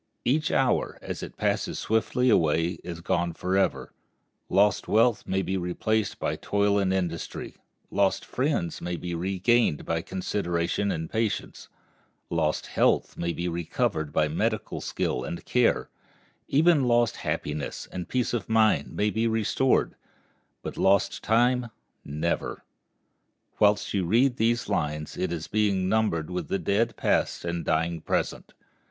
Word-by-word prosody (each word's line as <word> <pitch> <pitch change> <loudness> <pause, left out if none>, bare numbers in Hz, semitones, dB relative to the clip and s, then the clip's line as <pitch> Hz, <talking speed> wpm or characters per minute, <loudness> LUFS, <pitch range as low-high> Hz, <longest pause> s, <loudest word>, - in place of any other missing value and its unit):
Each 150 +5 +2
hour, 130 -2 +1
as - - -5
it - - -8
passes - - -1
swiftly 110 +3 +1
away, 80 -1 +2
is 85 -1 -6
gone 85 0 0
forever. 95 +3 0 0.6
Lost 105 +2 +3
wealth 115 0 +3
may 95 0 0
be 95 +1 -1
replaced 95 +3 -1
by - - -2
toil 100 0 +1
and 95 -1 +1
industry; 90 -4 -3 0.3
lost - - +1
friends 130 - -1
may 90 0 -3
be 85 +1 -5
regained 95 +1 +1
by 80 0 -1
consideration 90 +1 -1
and 80 0 -3
patience; 110 +3 -3 0.6
lost 80 -2 0
health - - +1
may 85 0 -2
be 85 +1 -3
recovered 80 -2 -1
by 75 +1 +2
medical 75 - -2
skill 65 - -2
and 85 - -6
care; 125 -2 +2 0.6
even 155 -1 +4
lost 120 -2 +3
happiness 75 0 -3
and 90 -1 -6
peace 125 -2 0
of 115 -4 -2
mind 110 -1 +2
may 105 +1 +1
be 110 +2 +1
restored; 115 +4 +1 0.7
but - - -6
lost 95 0 +2
time, 120 +2 +3 0.4
never. 75 +4 -2 1.0
Whilst 105 0 +3
you 100 -2 +1
read 120 +7 +3
these 120 0 +1
lines 75 -6 -2
it 95 -2 -2
is 80 -2 -3
being 100 -3 +1
numbered 95 -6 0
with 90 - -3
the - - 0
dead 100 +6 0
past - - 0
and 85 0 -2
dying 80 +1 0
present. - - -2
95 Hz, 140 wpm, -27 LUFS, 85-110 Hz, 1.0 s, even